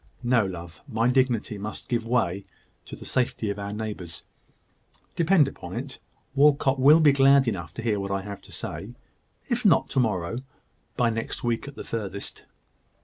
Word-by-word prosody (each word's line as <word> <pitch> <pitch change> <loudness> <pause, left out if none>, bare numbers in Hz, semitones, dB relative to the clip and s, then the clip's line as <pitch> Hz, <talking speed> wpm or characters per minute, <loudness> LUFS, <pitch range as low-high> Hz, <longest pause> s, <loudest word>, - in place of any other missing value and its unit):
No, 120 -2 +3
love; 85 -4 -7
my 115 -2 +1
dignity 125 -5 +1
must 105 +2 -6
give 115 -2 -1
way 100 -6 +1 0.4
to - - -8
the - - -11
safety 120 -4 0
of 100 - -6
our 100 0 -4
neighbours. 105 -5 -5 0.9
Depend 170 -3 +4
upon 90 -8 -8
it, 130 +3 -6 0.3
Walcot 140 -1 +4
will 145 +5 +7
be 150 -2 +7
glad 135 -1 +5
enough 85 -8 -2
to 115 - -5
hear 110 -3 +1
what 100 0 -3
I 100 0 -1
have 100 -1 -7
to - - -16
say 110 +5 -6 0.5
if 245 -1 -1
not 200 -6 +4
to 135 - +1
morrow, 105 -4 0 0.6
by 120 -2 +3
next 115 0 -4
week 120 +2 -1
at 145 - -9
furthest." 100 -3 -5
115 Hz, 170 wpm, -26 LUFS, 100-135 Hz, 0.9 s, will